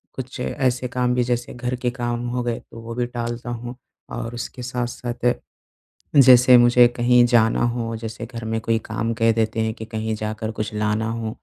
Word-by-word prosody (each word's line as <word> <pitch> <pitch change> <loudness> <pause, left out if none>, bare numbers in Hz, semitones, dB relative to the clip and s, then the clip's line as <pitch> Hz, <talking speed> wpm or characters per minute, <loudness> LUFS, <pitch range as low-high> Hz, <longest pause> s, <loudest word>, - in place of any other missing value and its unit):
कुछ 130 -1 -7
ऐसे 125 -1 -1
काम 125 0 0
भी 125 - +2
जैसे 120 0 -2
घर 125 +1 -3
के 125 0 -1
काम 120 -1 -3
हो 125 0 -2
गए 120 -1 -2
वो 115 0 -8
भी 125 - 0
टालता 120 0 -5
हूँ। 120 +1 -6 0.4
और 115 - -5
उसके 125 +1 -6
साथ-साथ 120 0 -2 0.8
जैसे 125 -2 +8
मुझे 120 0 +6
कहीं 120 0 +4
जाना 120 -1 +3
हो, 115 -1 -1
जैसे 110 0 -6
घर 115 -1 -8
में 110 0 -1
कोई 115 0 +1
काम 115 +1 -2
कह 115 0 +3
देते 110 0 0
हैं 110 0 0
कि 110 - -8
कहीं 110 0 -3
जाकर 110 +1 -4
कुछ 105 0 -4
लाना 105 +1 0
हो, 115 -1 -3
120 Hz, 190 wpm, -22 LUFS, 115-125 Hz, 0.8 s, जैसे